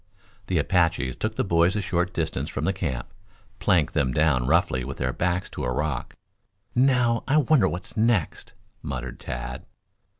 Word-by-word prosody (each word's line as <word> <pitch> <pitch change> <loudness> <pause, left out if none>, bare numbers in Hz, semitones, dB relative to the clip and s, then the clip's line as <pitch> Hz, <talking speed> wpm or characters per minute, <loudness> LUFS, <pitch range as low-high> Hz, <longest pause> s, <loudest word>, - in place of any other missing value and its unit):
The 90 - 0
Apaches 80 -5 +1
took - - -3
the - - 0
boys 85 +3 +3
a - - +1
short 90 0 0
distance 80 -1 -2
from - - -3
the 95 - +1
camp, 80 -6 -4 0.5
planked 90 -8 +2
them 70 -5 +1
down 65 -5 +2
roughly 65 -1 +2
with 70 +2 -6
their - - -1
backs 90 +2 0
to - - -5
a 60 - -1
rock. 70 0 -2 0.6
"Now, 125 -2 +3
I 145 +3 +3
wonder 145 -8 +4
what 90 +2 -7
next?" 110 -7 0 0.3
muttered 65 -2 -5
Tad. 60 +2 -5
85 Hz, 165 wpm, -25 LUFS, 70-95 Hz, 0.6 s, wonder